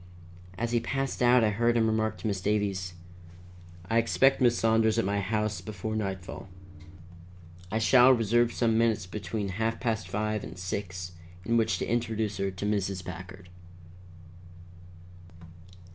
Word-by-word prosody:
As 120 +2 -2
he 120 - +2
passed 135 +3 -3
out 125 0 +5
I 105 - +3
heard 120 +3 +2
him 115 - +3
remark 110 0 0
to - - -10
Miss 100 -3 -2
Davies: 100 -3 -1 0.9
"I 115 +3 +3
expect 135 +4 +3
Miss 120 -1 +4
Saunders 110 0 +2
at 115 - +2
my 100 +1 0
house 105 -1 -1
before 110 +2 -5
nightfall. 95 -2 -5 1.2
I 110 - 0
shall 125 +3 +6
reserve 120 0 +3
some 115 -2 +1
minutes 115 -5 +1
between 105 +2 -4
half 110 +4 -2
past 115 -3 -2
five 105 0 -2
and - - -9
six 90 -1 -5 0.3
in 115 - +1
which 115 -1 +2
to - - -2
introduce 110 -3 -1
her 100 0 -1
to 95 +1 -6
Mrs. 100 -3 -1
Packard." 90 +1 -9
110 Hz, 145 wpm, -28 LUFS, 100-115 Hz, 1.2 s, shall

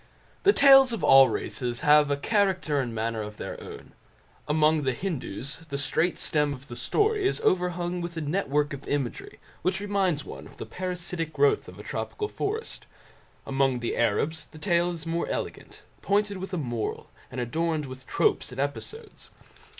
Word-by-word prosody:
The 400 - +6
tales 270 - +7
of 230 - -4
all 135 -1 +8
races 120 -2 -3
have 150 0 +5
a 145 - +1
character 185 -4 +1
and 125 -2 -3
manner 110 0 -2
of 105 0 -7
their - - -6
own. - - -10 0.6
Among 155 +1 +3
the 130 -2 0
Hindoos 140 - -4
the 140 - -3
straight 160 +5 +1
stem 150 -2 0
of 135 +1 -13
the 120 - -6
story 415 - +1
is - - -1
overhung 180 -1 0
with 170 -1 -5
a - - -2
network 150 -2 0
of 140 -1 -8
imagery 140 -4 -3 0.2
which 185 +1 0
reminds 195 -6 0
one - - -9
of - - -17
the - - -6
parasitic 180 -3 -4
growth 425 - +2
of - - -11
a - - -9
tropical 420 -1 -4
forest. 435 +2 -4 0.6
Among 135 -2 +1
the 120 - -2
Arabs 140 +8 0
the - - -14
tale 175 0 +1
is 165 -2 -7
more 165 +1 -1
elegant, - - -5 0.2
pointed 205 0 +1
with 190 +2 -6
a 180 - -2
moral, 120 -7 -3 0.2
and 125 - -6
adorned 155 +5 -1
with 130 0 -10
tropes - - +1
and 125 - -8
episodes. 425 - -5
160 Hz, 175 wpm, -27 LUFS, 135-185 Hz, 0.6 s, all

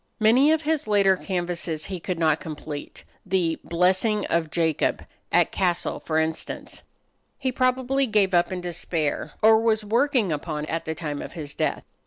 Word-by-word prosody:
Many 245 +7 +5
of 320 0 +1
his 305 -5 0
later 200 -2 +4
canvases 175 -4 -3
he 185 -2 -5
could 180 +1 -3
not 160 -2 +2
complete. 150 -2 -7 0.2
The 180 -4 0
"Blessing 185 +5 +2
of 165 -2 +1
Jacob," 160 -2 0 0.3
at - - +3
Cassel, 175 -2 0
for 155 - -2
instance, 160 0 -3 0.6
he 260 -2 -1
probably 260 +2 +1
gave 205 -4 +2
up 175 +1 +3
in 185 -1 -3
despair, 165 -3 -2
or 220 0 +7
was 220 -2 +1
working 235 - +2
upon 150 0 -3
at 165 +1 -3
the 160 - -3
time 150 -3 -4
of - - -8
his 150 -4 -6
death. - - -1
180 Hz, 165 wpm, -25 LUFS, 160-220 Hz, 0.6 s, or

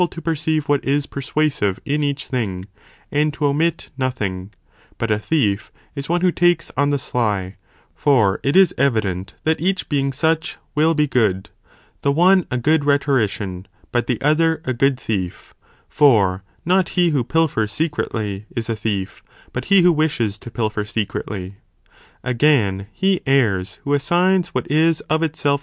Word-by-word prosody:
to - - -8
perceive 160 -2 -1
what 145 -1 +1
is 140 +1 0
persuasive 140 -8 -1
in 145 +1 0
each 145 -1 -2
thing, 100 -8 -3 0.5
and 150 +1 +1
to 150 - -1
omit 160 +4 0
nothing; 100 -8 -2 0.5
but 115 -1 -2
a 105 - +2
thief 105 -6 0 0.2
is 140 0 -6
one 175 +1 +1
who 180 -1 +3
takes 175 0 +1
on 145 +1 +2
the 145 - +1
sly, 105 -8 -2 0.4
for 110 -10 +2
it 140 - 0
is 190 -2 +6
evident 100 -9 0
that 160 -1 0
each 190 +2 0
being 140 -2 0
such, 160 +4 0 0.2
will 160 +2 +2
be 150 0 +3
good, 105 -9 0 0.5
the 140 - +2
one 180 +4 +4
a 125 - -1
good 150 +4 +2
rhetorician, 110 -10 0 0.2
but 120 -1 0
the 125 -4 -1
other 160 +2 +2
a 130 - -1
good 135 +1 +1
thief, 95 -7 -4 0.3
for 100 -10 +3 0.2
not 185 +1 +2
he 175 -2 +4
who 140 -5 +1
pilfers 150 -7 0
secretly 110 -8 -3
is 115 0 -2
a - - -1
thief, 105 -2 -3 0.3
but 125 +1 -4
he 195 -2 +5
who 175 -1 +5
wishes 120 -10 0
to 120 - -9
pilfer 110 -2 -2
secretly. 100 -2 -4 0.7
Again, 115 -7 +2
(he 190 -1 +1
errs,) 105 -9 +1
who 140 - -1
assigns 175 +5 +2
what 125 -6 -3
is 160 +1 +3
of 160 +1 +2
itself 145 -3 0
140 Hz, 160 wpm, -20 LUFS, 105-155 Hz, 0.7 s, is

